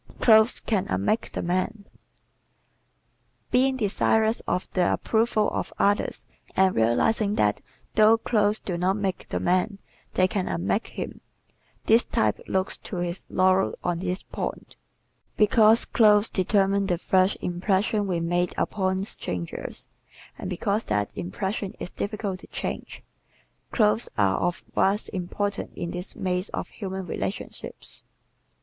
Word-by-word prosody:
Clothes 220 0 +5
Can 205 -5 -1
Unmake 95 - 0
the - - -3
Man 185 +4 -1
¶ - - -29 1.6
Being 260 +1 +3
desirous 220 0 +2
of 180 - -1
the 180 -2 +2
approval 220 -1 +1
of - - -3
others 205 +1 +1 0.3
and 190 -1 +4
realizing 200 - +2
that 105 - +1 0.3
though 220 +1 +6
clothes 215 -2 +1
do 175 -5 -4
not 185 +2 +2
make 195 -3 -3
the - - -1
man 185 +3 +1 0.4
they 185 - +4
can 185 -1 -2
unmake 90 +3 -1
him, - - -6 0.6
this 225 +2 +5
type 110 -1 0
looks 190 0 0
to - - -8
his 175 0 -3
laurels 185 +1 +3
on 175 -1 -1
this 185 +1 -2
point. - - -6 0.6
Because 220 +1 +5
clothes 210 -1 +4
determine 195 +1 +2
the 175 -3 +1
first 185 +2 +2
impressions 195 +3 0
we 175 -3 0
make 175 +1 0
upon 190 -1 0
strangers 90 - -4 0.5
and - - -6
because 200 +4 -1
that 105 -1 -1
impression 190 - -3
is - - -6
difficult 200 -2 -3
to - - -14
change, - - -5 0.7
clothes 220 0 +3
are 100 -3 +3
of 175 - -1
vast 200 +3 +1
importance 195 +2 -3
in 170 - -4
this 180 +1 -5
maze 185 +1 -2
of - - -4
human 190 -2 -5
relationships. 190 +4 -5
190 Hz, 135 wpm, -26 LUFS, 180-210 Hz, 1.6 s, though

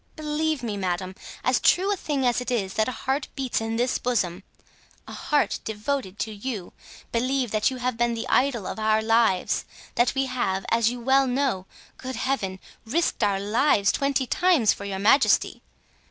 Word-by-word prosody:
Believe 305 -2 -1
me, 215 -3 -3
madame, 185 -1 -2 0.3
as - - +2
true 390 +3 +3
a - - -1
thing 290 -7 -2
as 245 0 +2
it 250 - -4
is 200 -6 -1
that 220 - +1
a - - -1
heart 270 +1 0
beats 260 -4 -1
in 225 0 -2
this 245 +2 0
bosom—a 195 -7 -5
heart 295 -1 0
devoted 220 -1 -3
to 220 - -3
you—believe 240 +3 -4
that 215 +2 +2
you 260 - -6
have 250 -1 -2
been 240 0 +1
the 225 - -4
idol 255 -6 +2
of - - -5
our 215 0 +2
lives; 225 -4 +2 0.3
that 240 +3 +2
we 270 0 +1
have, 215 -7 -2
as 230 0 +3
you 245 0 -5
well 265 +2 +3
know—good 255 0 -3
Heaven!—risked 230 - -2
our 200 -2 +2
lives 210 0 +2
twenty 275 -2 0
times 310 - +3
for 200 - -8
your 195 -1 -3
majesty. 225 +8 +3
240 Hz, 170 wpm, -25 LUFS, 210-270 Hz, 0.3 s, true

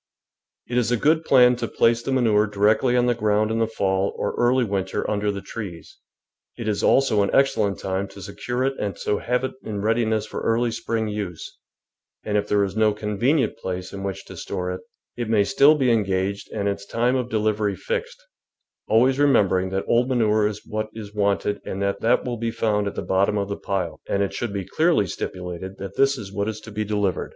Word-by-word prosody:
It 125 0 +1
is 115 - 0
a 120 - +3
good 155 +6 +2
plan 125 -2 +6
to - - -3
place 115 0 +2
the 135 - -3
manure 110 -5 +3
directly 110 +5 +2
on 120 - +3
the 120 - +3
ground 110 -1 +1
in 115 - 0
the 115 - +2
fall 95 -3 0
or 105 - -2
early 125 +1 +2
winter 95 -3 -2
under 105 0 0
the 100 -1 -5
trees; 90 -8 -8 0.6
it 115 - -5
is 105 -2 0
also 130 -6 +3
an 100 - +1
excellent 110 -7 +2
time 95 +1 -2
to 100 - -12
secure 120 +7 -3
it 135 +1 +1
and 100 -4 -3
so 105 - -1
have 125 +1 -1
it 130 - -1
in 105 -2 -5
readiness 110 -1 +1
for - - -6
early 115 +1 +1
spring 110 0 -2
use, 100 -6 -5 0.7
and 105 - -2
if 105 0 +1
there 100 -1 +2
is 100 0 -3
no 110 -1 +3
convenient 110 +8 0
place 90 -2 -5
in 100 - -6
which 95 -2 -5
to - - -10
store 90 0 -4
it, 90 0 -5 0.4
it 120 -2 -3
may 110 -3 +4
still 145 +8 +5
be 130 -4 +2
engaged 100 -2 0
and 100 -2 -2
its 100 0 -2
time 120 +5 0
of 125 -2 -1
delivery 105 -2 0
fixed, - - -4 0.6
always 130 +5 +3
remembering 95 -10 +3
that 95 +1 -2
old 120 +2 +2
manure 110 -4 +2
is 105 0 -6
what 110 0 -3
is 105 -2 -8
wanted 100 0 0
and 95 - -5
that 100 0 -1
that 120 +2 +2
will 120 -1 -3
be 115 +1 -2
found 105 -2 0
at - - -4
the - - -3
bot 95 +1 +2
tom 105 - 0
of 100 0 -2
the 100 - -2
pile, 90 -6 -3
and 100 - +1
it 100 - -3
should 120 -3 -3
be 100 -2 -4
clearly 160 - +2
stipulated 90 +1 -6
that 95 0 -7
this 135 0 +3
is 100 -4 -8
what 100 +2 -1
is 110 -1 -5
to 110 - -11
be 105 +1 -2
delivered. 105 -3 -1
105 Hz, 220 wpm, -23 LUFS, 100-120 Hz, 0.7 s, plan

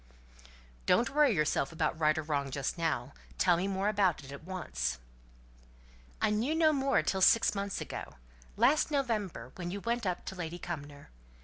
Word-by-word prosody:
"Don't 235 - +3
worry 295 -1 +4
yourself 150 -2 +1
about 160 0 -1
right 155 -1 +3
or 155 - -1
wrong 145 -2 -1
just 135 0 -2
now; 155 -6 -2 0.2
tell 180 -2 +4
me 180 +3 -1
more 195 +1 -1
about 200 -7 +2
it, 135 - -10
at 140 +2 -9
once." 65 - -3 1.2
"I - - +2
knew 235 +9 0
no 320 -1 +4
more 275 -1 +2
till 190 - -1
six 225 +4 +5
months 200 -1 -3
ago - - -6 0.4
last 305 +1 +4
November, 215 - -2
when 175 -1 -4
you 200 +3 -4
went 235 0 -1
up 180 -1 -2
to 190 - -6
Lady 175 -1 -5
Cumnor. 145 - -7
180 Hz, 175 wpm, -31 LUFS, 155-215 Hz, 1.2 s, six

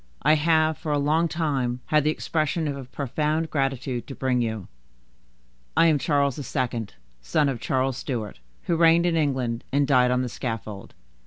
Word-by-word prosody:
I 150 +3 +5
have, 155 0 +2
for 155 - -3
a 145 - +2
long 155 +4 +2
time, 135 -7 -1
had 150 -1 +2
the 150 - +2
expression 155 +1 -1
of 145 - -2
a 135 -2 -7
profound 150 +5 -2
gratitude 135 -3 -2
to 135 - -7
bring 130 -2 0
you. 110 -4 -3 1.1
I - - +6
am 155 -3 +4
Charles 140 -3 +1
II., 120 -5 -2 0.3
son 145 - +1
of 130 -4 -2
Charles 130 -1 0
Stuart, 115 - -4 0.2
who 170 - 0
reigned 165 +1 +5
in 175 -1 +2
England, 130 -7 0
and 140 +1 +2
died 125 -2 +4
on 125 0 +1
the - - -2
scaffold." 110 -5 -6
140 Hz, 175 wpm, -25 LUFS, 125-155 Hz, 1.1 s, I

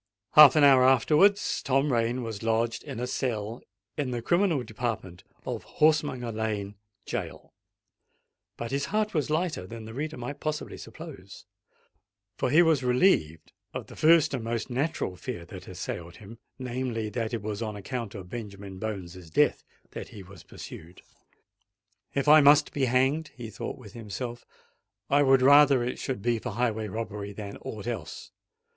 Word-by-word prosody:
Half 150 -3 +9
an 155 - +5
hour 135 -2 +7
afterwards 155 +10 +4
Tom 135 +1 +1
Rain 120 +2 0
was 110 -3 -5
lodged 115 0 0
in 135 -5 -7
a 125 - -1
cell 115 -3 -3 0.3
in 145 -3 -2
the 120 -2 -3
criminal 175 -3 +2
department 110 -6 -5 0.2
of - - -4
Horsemonger 150 -6 +1
Lane 105 -2 -3 0.3
Gaol;—but 115 - -10
his 140 +1 0
heart 215 0 -1
was 155 -4 0
lighter 155 - -1
than 115 +1 -8
the 110 - -9
reader 155 +5 -4
might 130 +4 -6
possibly 155 -1 -4
suppose—for 100 +4 -10
he 160 +6 +6
was 160 -5 +3
relieved 125 - +2 0.2
of - - -4
the - - -13
first 160 -1 +5
and 125 -4 -2
most 115 +2 -3
natural 130 - -1
fear 90 -2 -6
that - - -10
had - - -9
assailed 85 0 -6
him: 110 +3 -12 0.2
namely, 125 -3 -3
that 110 +1 -3
it 115 -4 -3
was 105 0 -4
on 110 -2 -3
account 115 +1 -5
of 95 -3 -8
Benjamin 100 -3 -8
Bones's 90 -5 -6
death 80 - +2 0.3
that - - -7
he 100 - -11
was 95 -2 -14
pursued! 85 +3 -11 1.1
"If 140 +1 0
I 155 +1 +9
must 145 +1 +5
be 140 -2 +1
hanged," 135 +5 +2
he 115 -3 -8
thought 105 - -6
within 115 -1 -11
himself, 120 +3 -6 0.6
"I 145 +1 +5
would 135 -2 +5
rather 140 -2 +7
it 125 - -3
should 130 -7 -4
be 120 -1 +1
for 125 -1 -5
highway 110 -2 -1
robbery 105 -1 -5
than 100 0 -7
aught 105 -1 -7
else! 110 -10 -6
120 Hz, 165 wpm, -27 LUFS, 105-140 Hz, 1.1 s, Half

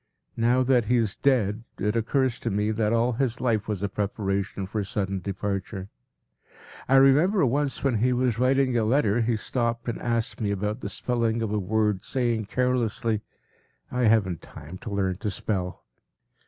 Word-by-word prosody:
Now 120 +3 +3
that 125 -3 +3
he 125 - +2
is 110 -4 0
dead 115 -6 +1
it 105 +2 -1
occurs 125 +2 +1
to 115 - -2
me 105 +1 0
that 110 -1 0
all 115 +2 +2
his 125 -1 -1
life 115 -5 0
was 105 -3 -3
a - - +2
preparation 100 -1 -2
for 105 +2 -3
sudden 95 0 -2
departure. 100 0 -4 1.0
I 135 - +5
remember 150 +7 +5
once 140 +2 0
when 130 -6 +1
he 125 +3 +2
was 125 -2 +1
writing 130 0 +2
a 115 - +2
letter 115 -1 +2
he 115 0 +1
stopped 115 +1 -2
and 115 - -3
asked 115 -1 -1
me 105 - 0
about 105 +3 -2
the - - -5
spelling 115 -2 -1
of 110 - -2
a 105 - +1
word, 105 0 0
saying 120 -4 -1
carelessly, 115 -2 0 0.7
“I 125 -1 +1
haven’t 100 -6 +2
time 85 +6 -11
to - - -7
learn 95 -2 -1
to 105 +1 -3
spell. 95 -2 -3
115 Hz, 175 wpm, -26 LUFS, 100-125 Hz, 1.0 s, I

